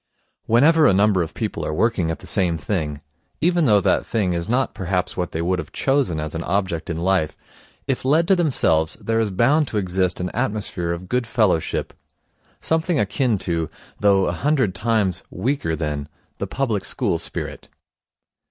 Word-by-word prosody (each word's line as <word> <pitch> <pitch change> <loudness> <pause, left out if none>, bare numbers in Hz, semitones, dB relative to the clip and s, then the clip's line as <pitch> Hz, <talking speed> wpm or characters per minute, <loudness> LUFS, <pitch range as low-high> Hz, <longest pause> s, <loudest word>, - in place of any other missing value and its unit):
Whenever 150 +7 +5
a - - +5
number 100 -2 +3
of 80 - -4
people - - -3
are - - -2
working 105 -5 +1
at 80 - -2
the - - -14
same 90 -5 0
thing, 75 -3 -3 0.4
even 175 0 +2
though 105 -5 +5
that 95 - +2
thing 100 -6 0
is 85 +3 -3
not 130 +2 +1
perhaps 90 -2 -2
what 90 -1 -2
they 80 - -2
would 90 +1 0
have 80 - -6
chosen 135 - +1
as 75 0 -4
an 80 - -3
object 95 -3 -1
in 80 - -2
life, 90 -2 0 0.5
if 135 -2 -2
left 155 +6 +3
to 195 - +6
themselves, 100 - +1
there 115 0 0
is 110 -2 +1
bound 135 +10 +3
to 110 - -3
exist 95 -1 0
an 90 0 -2
atmosphere 105 -7 -2
of 85 +2 -5
good 125 +3 -1
fellowship; 105 -8 0 0.7
something 160 -1 0
akin 110 +2 +1
to, 85 -4 -2 0.3
though 100 -2 +4
a - - 0
hundred 140 -9 +1
times 105 -4 0
weaker 95 - -1
than, 75 -2 -3 0.3
the - - -2
public 120 -7 -1
school 100 -10 -1
spirit. 85 - -6
100 Hz, 180 wpm, -22 LUFS, 85-125 Hz, 0.7 s, to